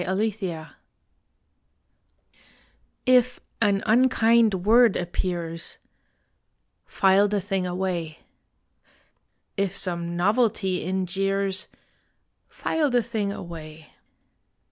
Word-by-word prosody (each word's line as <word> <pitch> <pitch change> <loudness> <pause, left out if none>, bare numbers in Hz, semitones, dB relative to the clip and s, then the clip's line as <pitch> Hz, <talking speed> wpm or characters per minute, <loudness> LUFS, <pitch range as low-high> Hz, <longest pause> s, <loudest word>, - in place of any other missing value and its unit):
ON 195 +5 0
FILE 175 -6 -6 2.4
IF 250 -1 +3 0.2
an 200 -2 +2
unkind 225 -4 +3
word 230 0 +5
appears, 170 -1 -4 1.1
File 195 +1 +3
the 205 0 0
thing 195 -1 -2
away. 175 -3 -3 1.4
If 195 -1 -1
some 170 -2 -3
novelty 195 -1 +1
in 185 +1 -1
jeers, 195 +1 -1 0.8
File 310 -3 -1
the 245 -2 +2
thing 215 -3 -2
away. 160 -4 -10
195 Hz, 80 wpm, -25 LUFS, 175-220 Hz, 2.4 s, word